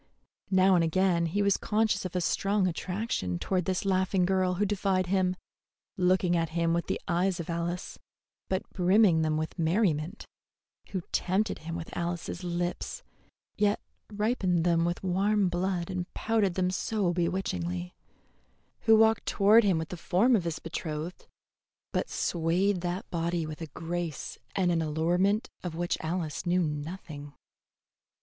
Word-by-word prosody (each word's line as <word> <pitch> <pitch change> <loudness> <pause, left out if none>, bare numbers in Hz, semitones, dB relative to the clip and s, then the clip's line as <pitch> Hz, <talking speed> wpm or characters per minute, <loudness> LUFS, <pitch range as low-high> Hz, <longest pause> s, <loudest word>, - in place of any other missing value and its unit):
Now 190 0 +5
and 175 -2 +4
again 170 0 +2
he 200 +5 0
was 200 -1 +3
conscious 215 -3 +1
of 185 - -5
a 180 - +1
strong 200 +3 +1
attraction 180 - -2
toward 180 - -1
this 190 +2 -1
laughing 190 -1 +2
girl 185 -1 +1
who 205 +3 +1
defied 190 -2 +1
him, 185 0 +1 0.6
looking 180 -1 +2
at 165 -1 +1
him 165 0 +2
with 170 0 -1
the - - -1
eyes 180 +1 +1
of 170 0 -4
Alice, 170 +1 -3 0.5
but 190 0 -1
brimming 185 -2 +4
them 155 -1 +1
with 160 +3 -4
merriment; 165 +1 0 0.6
who 190 - -3
tempted 195 +4 0
him 165 +1 -6
with 165 -1 -7
Alice's 175 +1 -3
lips, 175 - -3 0.5
yet 205 0 +2 0.3
ripened 205 -5 +1
them 170 -1 +3
with 175 +2 -2
warm 195 +2 +2
blood 180 0 -1
and 180 -1 -4
pouted 215 -5 +1
them 185 -1 +1
so 195 -1 0
bewitchingly; 90 - -2 0.9
who 225 -1 +5
walked 220 0 +4
toward 215 +4 +5
him 190 -5 +3
with 160 0 -3
the 180 - -6
form 210 +9 +3
of 185 -6 0
his 165 -2 -2
betrothed, 160 0 -5 0.6
but - - -1
swayed 175 +3 +1
that 175 +2 -3
body 170 -1 -1
with 155 +1 -7
a 165 - -4
grace 165 0 -5 0.2
and 185 -3 +2
an 165 -1 +1
allurement 175 +7 +1
of 175 -3 -5
which 175 +1 0
Alice 160 -1 -3
knew 180 +1 +3
nothing. 150 -1 -5
180 Hz, 155 wpm, -29 LUFS, 170-195 Hz, 0.9 s, Now